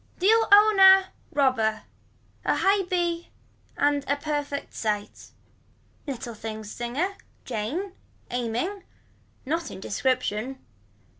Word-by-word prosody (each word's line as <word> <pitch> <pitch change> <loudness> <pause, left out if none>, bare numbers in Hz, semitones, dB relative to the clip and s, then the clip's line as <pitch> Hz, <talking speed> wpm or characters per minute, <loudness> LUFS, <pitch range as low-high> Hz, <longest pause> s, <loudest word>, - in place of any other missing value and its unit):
Deal 445 +4 +4
own 415 0 +7
a. 380 0 +8 0.2
Robber. 255 -6 +1 0.6
A - - +1
high 395 +1 +3
b 345 -1 -1 0.5
and 285 0 +2
a 285 - +2
perfect 285 -1 -4
sight. 210 -2 -3 0.8
Little 245 -3 -5
things 215 -1 -7
singer. 285 +12 -3 0.3
Jane. 260 - -3 0.4
Aiming. 245 - -2 0.6
Not 325 +4 -2
in - - -9
description. 255 +3 -1
285 Hz, 100 wpm, -26 LUFS, 235-370 Hz, 0.8 s, a